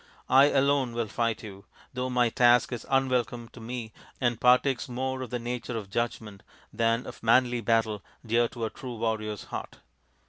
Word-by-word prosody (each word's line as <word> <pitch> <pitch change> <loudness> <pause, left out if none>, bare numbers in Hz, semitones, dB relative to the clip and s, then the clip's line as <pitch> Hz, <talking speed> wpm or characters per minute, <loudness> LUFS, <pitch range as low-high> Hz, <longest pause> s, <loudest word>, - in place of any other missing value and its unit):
I 135 +2 +8
alone 140 -3 +2
will 120 0 -1
fight 115 +1 -1
you, 100 -2 -10 0.3
though 125 0 -2
my 125 -1 +2
task 120 +1 +4
is 120 - -6
unwelcome 125 -3 0
to - - -14
me 115 -1 -6 0.3
and 120 -3 0
partakes 125 +1 +3
more 130 +1 -3
of 130 - -5
the 125 - -2
nature 120 0 -4
of 100 -3 -7
judgment 110 -3 -3 0.3
than 115 +1 +1
of - - -9
the - - -14
manly 120 0 +4
battle 110 -2 +1 0.2
dear 115 +1 +2
to 115 -1 -5
a 110 - -4
true 125 -2 -7
warrior's 110 -2 -2
heart." - - -7
120 Hz, 180 wpm, -28 LUFS, 115-125 Hz, 0.3 s, I